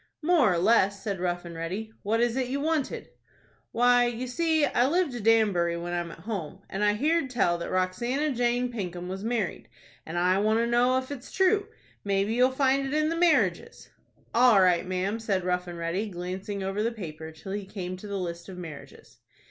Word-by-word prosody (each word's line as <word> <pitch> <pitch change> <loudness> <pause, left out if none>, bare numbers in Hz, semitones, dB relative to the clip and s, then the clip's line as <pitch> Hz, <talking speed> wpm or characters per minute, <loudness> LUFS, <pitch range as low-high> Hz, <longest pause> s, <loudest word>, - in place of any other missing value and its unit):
"More 310 - +4
or 175 - +1
less," 200 +1 +3
said 200 -3 -3
Rough 175 -1 -2
and 170 -1 -8
Ready. 190 +7 -5
"What 225 +3 0
is 240 -1 +1
it 260 -1 0
you 270 +3 -2
wanted?" 310 -1 -1 0.6
"Why, 245 +1 +4
you 240 +1 -3
see 315 +3 +1
I 245 -2 +2
live 345 0 +1
to 245 - -5
Danbury 205 -6 +3
when 175 +1 -5
I'm 175 -1 -2
at 165 - -11
home, 190 -6 -5
and 195 +2 -2
I 210 0 +4
heerd 305 +4 +1
tell 175 -9 +1
that 170 - -5
Roxanna 240 +11 0
Jane 245 +1 +1
Pinkham 180 -6 -5
was 190 +2 -5
married, 225 -5 -2 0.3
and 165 +2 -6
I 180 +2 +3
want 215 +2 +2
to 230 - +2
know 240 +2 +3
ef 260 +1 -4
it's 275 -2 -8
true. 400 +2 +2 0.4
Maybe 200 +1 0
you'll 250 +2 +4
find 270 +1 +1
it 275 - -2
in 305 0 +2
the 330 - -1
marriages." 295 - +1 0.4
"All 235 -3 +6
right, 180 -1 +3
ma'am," 185 +4 -1
said 200 -5 -1
Rough 180 0 -1
and 175 -1 -7
Ready, 170 +6 -2
glancing 190 +2 -5
over 195 +2 -2
the 230 +2 0
paper 160 -7 -8
till 160 +5 -10
he 200 -1 -4
came 185 -2 -5
to 210 - -10
the 200 -1 -3
list 170 -1 -5
of 185 - -9
marriages. 165 -5 -11
210 Hz, 205 wpm, -27 LUFS, 180-250 Hz, 0.6 s, All